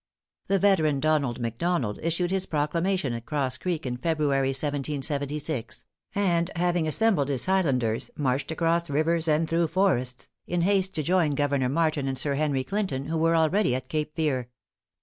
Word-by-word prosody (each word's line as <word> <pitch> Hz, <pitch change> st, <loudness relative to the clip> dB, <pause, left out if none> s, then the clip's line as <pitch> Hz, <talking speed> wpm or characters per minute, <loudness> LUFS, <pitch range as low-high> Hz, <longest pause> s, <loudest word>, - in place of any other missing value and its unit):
The 195 Hz, -, +2 dB
veteran 160 Hz, -8 st, +3 dB
Donald 145 Hz, -5 st, +1 dB
McDonald 120 Hz, 0 st, -1 dB
issued 170 Hz, +2 st, -1 dB
his 190 Hz, 0 st, +1 dB
proclamation 165 Hz, 0 st, 0 dB
at 115 Hz, 0 st, -7 dB
Cross 140 Hz, -4 st, -1 dB
Creek, 175 Hz, -5 st, -3 dB
in 125 Hz, -1 st, -3 dB
February, 145 Hz, -2 st, 0 dB
1776, 145 Hz, -1 st, -1 dB, 0.3 s
and 175 Hz, -4 st, +1 dB
having 175 Hz, -1 st, +1 dB
assembled 180 Hz, -4 st, +2 dB
his 135 Hz, -3 st, +2 dB
Flighlanders, 135 Hz, -12 st, +1 dB
marched 135 Hz, -1 st, -1 dB
across 170 Hz, +1 st, 0 dB
rivers 160 Hz, +3 st, +1 dB
and 155 Hz, +1 st, +2 dB
through 165 Hz, +1 st, +1 dB
forests, 155 Hz, -9 st, 0 dB, 0.2 s
in 175 Hz, 0 st, 0 dB
haste 190 Hz, +1 st, +2 dB
to 155 Hz, -, -1 dB
join 170 Hz, -3 st, +2 dB
Governor 140 Hz, -3 st, +1 dB
Martin 155 Hz, -1 st, 0 dB
and 135 Hz, -1 st, -1 dB
Sir 140 Hz, +2 st, +1 dB
Henry 140 Hz, -2 st, 0 dB
Clinton, 165 Hz, -5 st, -2 dB
who 165 Hz, +2 st, -2 dB
were 165 Hz, +1 st, +3 dB
already 165 Hz, -2 st, +2 dB
at 130 Hz, 0 st, -5 dB
Cape 155 Hz, -1 st, -3 dB
Fear. 135 Hz, -7 st, -1 dB
155 Hz, 160 wpm, -26 LUFS, 135-170 Hz, 0.3 s, veteran